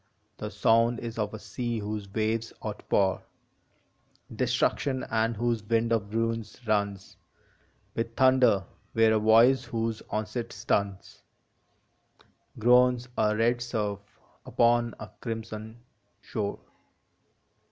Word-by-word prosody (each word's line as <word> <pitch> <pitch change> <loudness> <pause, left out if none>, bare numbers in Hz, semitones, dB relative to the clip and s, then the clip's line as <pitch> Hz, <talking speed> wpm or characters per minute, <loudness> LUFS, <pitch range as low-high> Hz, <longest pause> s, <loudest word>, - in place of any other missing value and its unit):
The - - -4
sound 115 +1 +3
is 115 -1 -6
of 105 -1 -1
a 110 - -6
sea 115 +3 -4
whose 105 -1 -5
waves 110 +1 -1
outpour 100 -2 0 1.1
Destruction, 130 -2 0
and 115 +1 +1
whose 120 -1 0
wind 115 +2 +1
of 105 -3 -1
ruin 115 0 0 0.2
runs 100 -2 -1 0.8
With 115 0 -3
thunder, 130 -7 +4 0.3
where 110 -1 +4
a 110 - +3
voice 115 +5 +5
whose 115 -1 -2
onset 115 +2 -3
stuns 100 -1 -2 1.4
Groans 125 +1 +4
a 105 0 +2
red 120 +2 +2
surf 105 -4 -2 0.4
upon 120 -1 +2
a 110 - -9
crimson 110 0 -6 0.4
shore. 100 -2 -4
115 Hz, 110 wpm, -28 LUFS, 105-120 Hz, 1.4 s, voice